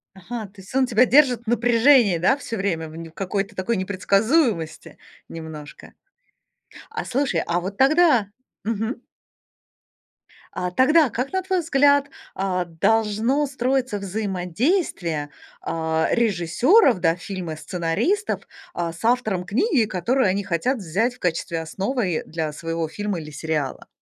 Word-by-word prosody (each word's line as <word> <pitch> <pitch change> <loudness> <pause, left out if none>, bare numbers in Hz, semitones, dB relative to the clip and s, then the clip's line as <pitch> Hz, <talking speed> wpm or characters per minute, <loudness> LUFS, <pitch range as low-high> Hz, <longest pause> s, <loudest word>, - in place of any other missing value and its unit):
Ага. 220 +4 -6
То 195 0 -15
есть 190 - -14
он 265 -1 +4
тебя 245 +1 +4
держит 255 -3 +4
в - - -36
напряжении, 235 -3 +4
да? 190 - +2
Всё 230 -5 -5
время 170 -5 -2
в - - -13 0.2
в - - -20
какой-то 195 +2 -3
такой 200 +4 -1
непредсказуемости 200 - 0 0.3
немножко. 160 -2 -9 1.0
А 450 0 -4
слушай, 275 +2 0
а 175 +1 0
вот 195 +3 -6
тогда 280 - +4 0.4
мгм. 225 +3 -3 1.5
А 180 0 -3
тогда 290 - +4
как, 250 +5 -3
на 375 - +1
твой 375 -1 0
взгляд, 285 -2 +3 0.3
а, 185 -2 -1
должно 220 - +1
строиться 260 -3 -1
взаимодействие, 190 - -1 0.3
а, 160 0 -1
режиссёров, 235 - +3
да, 165 -1 +2
фильмы 180 -3 -6
сценаристов, 180 - -1 0.3
а, 170 -1 -2
с 170 - -12
автором 220 -7 +1
книги, 250 - +2
которую 210 +6 +1
они 195 +2 0
хотят 195 +8 0
взять 205 +5 -1
в - - -23
качестве 165 -1 -2
основы 190 +2 -2
для 160 -1 -3
своего 165 +1 -3
фильма 205 +1 -3
или 155 -1 -9
сериала? 150 -3 -3
205 Hz, 135 wpm, -23 LUFS, 175-255 Hz, 1.5 s, он